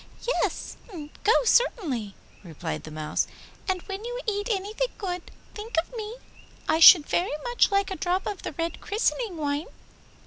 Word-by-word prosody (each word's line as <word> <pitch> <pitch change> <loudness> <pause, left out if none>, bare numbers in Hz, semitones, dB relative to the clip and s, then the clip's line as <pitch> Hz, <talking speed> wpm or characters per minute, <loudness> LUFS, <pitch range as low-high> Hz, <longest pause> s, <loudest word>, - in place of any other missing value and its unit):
'Yes, - - -1 0.5
go 440 - +4
certainly,' 315 - +1 0.3
replied 155 - -5
the - - -8
Mouse, 155 0 -1 0.4
'and 370 -1 -1
when 390 +1 -6
you 485 +1 -4
eat 410 0 -1
anything 425 +4 -1
good, 360 -4 -4 0.2
think 435 +2 -6
of 350 +9 -5
me; 440 0 -5 0.5
I 315 - +3
should 330 -2 +10
very 345 -4 0
much 485 0 +3
like 395 -1 +1
a 380 - -3
drop 365 +1 0
of 405 -3 -4
the - - -5
red 330 +3 -3
christening 440 -2 -1
wine. 290 +1 -1
385 Hz, 160 wpm, -26 LUFS, 320-440 Hz, 0.5 s, should